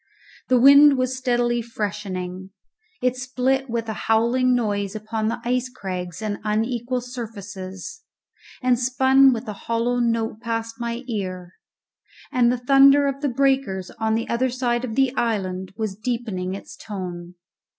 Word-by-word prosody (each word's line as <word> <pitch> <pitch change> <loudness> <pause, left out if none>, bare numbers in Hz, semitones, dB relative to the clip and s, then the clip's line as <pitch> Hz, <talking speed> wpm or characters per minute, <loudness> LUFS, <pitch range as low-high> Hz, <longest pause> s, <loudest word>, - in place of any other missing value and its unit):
The 255 -1 +4
wind 280 +2 +8
was 255 0 0
steadily 240 -2 +1
freshening; 190 -4 -5 0.5
it 250 0 +2
split 260 +1 -1
with 230 -1 -2
a 220 - -2 0.2
howling 245 +3 +3
noise 205 -4 -1
upon 215 0 -3
the 235 +2 -2
ice 250 +1 0
crags 185 -5 -6
and 205 -1 -3
unequal 235 +3 -1
surfaces, 205 - -8 0.6
and 250 -2 +3
spun 265 +2 +5
with 240 0 -3
a 210 - -3 0.2
hollow 235 +2 +1
note 230 -2 0
past 230 0 -4
my 235 +1 -3
ear; 185 -5 -4 0.8
and 245 -1 +3
the 250 - 0
thunder 275 +3 +6
of 275 0 -2
the 290 - +1
breakers 265 -8 0
on 220 0 +1
the 230 - -2
other 255 +2 +1
side 240 -1 -1
of 225 -3 -4
the 270 -1 +2
island 190 -5 -2
was 215 -4 -3
deepening 215 -5 -3
its 200 - -10
tone. 180 -4 -7
235 Hz, 150 wpm, -23 LUFS, 210-255 Hz, 0.8 s, wind